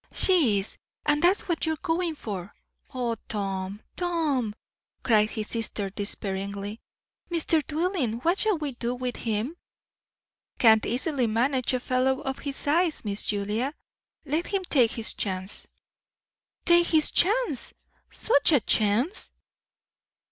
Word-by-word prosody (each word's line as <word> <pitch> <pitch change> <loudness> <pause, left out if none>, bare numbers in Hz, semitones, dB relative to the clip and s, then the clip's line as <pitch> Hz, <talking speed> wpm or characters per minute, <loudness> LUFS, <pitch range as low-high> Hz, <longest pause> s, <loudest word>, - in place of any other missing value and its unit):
"She 315 - +4
is, 195 +1 -4 0.3
and 295 0 +2
that's 360 +4 +3
what 340 -2 -1
you're 320 - +1
going 330 0 -1
for. 200 -8 -6 0.4
O 240 -3 -2
Tom, 195 -1 -3
Tom!" 305 -11 0 0.5
cried 215 -3 +4
his 215 -1 -4
sister 210 -3 -3
despairingly. 200 +1 -2 0.5
"Mr. 330 -2 +1
Dillwyn, 315 - 0
what 345 +4 +2
shall 430 -4 +2
we 300 -2 -3
do 240 0 -3
with 250 -1 -3
him?" 225 +7 -2 1.0
"Can't 220 -2 +5
easily 255 +1 +1
manage 255 +3 +1
a - - 0
fellow 260 +1 +1
of 270 -2 -4
his 280 -2 -4
size, 320 -1 +1
Miss 200 0 -3
Julia. 215 +8 -1 0.5
Let 310 +4 -1
him 390 -2 -1
take 260 -10 +3
his 230 -1 -2
chance." 190 0 -3 1.0
"Take 345 0 +6
his 315 -2 +3
chance! 405 - +1 0.3
Such 325 -6 +3
a 285 - +6
chance!" 225 - +1
255 Hz, 130 wpm, -26 LUFS, 215-320 Hz, 1.0 s, Take